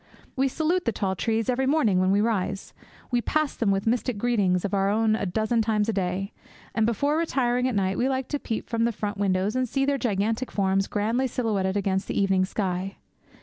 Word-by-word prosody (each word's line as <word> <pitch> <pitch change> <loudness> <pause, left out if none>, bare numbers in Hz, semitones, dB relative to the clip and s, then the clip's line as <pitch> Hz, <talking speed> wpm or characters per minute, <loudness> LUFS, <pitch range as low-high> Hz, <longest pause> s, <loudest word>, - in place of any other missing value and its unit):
We 270 +1 +2
salute 325 +6 0
the 230 - +2
tall 190 -3 -2
trees 225 +6 -1
every 260 +1 +1
morning 245 -11 +3
when 185 0 +2
we 200 +2 +3
rise; 200 -3 -1 0.4
we 245 -1 +2
pass 310 +3 0
them 225 - 0
with 195 0 +1
mystic 240 0 0
greetings 200 -6 +1
of 200 - -3
our 195 0 +2
own 215 +1 +2
a 200 - -2
dozen 220 +5 +1
times 215 -1 +1
a - - +1
day; 190 +1 -2 0.4
and, 220 0 +2
before 285 +7 +1
retiring 250 -6 +1
at 255 - -1
night, 190 -1 0
we 255 +2 +2
like 260 -1 -1
to 290 - -1
peep 225 - -4
from 230 -1 0
the 235 - +1
front 205 -2 -4
windows 195 +1 +1
and 255 -1 0
see 270 +2 +1
their 280 0 0
gigantic 225 +2 -1
forms 195 -1 +1
grandly 225 +5 0
silhouetted 205 -6 -1
against 190 -1 -1
the - - -1
evening 195 -1 +2
sky. 190 -1 -3
220 Hz, 215 wpm, -25 LUFS, 195-245 Hz, 0.4 s, morning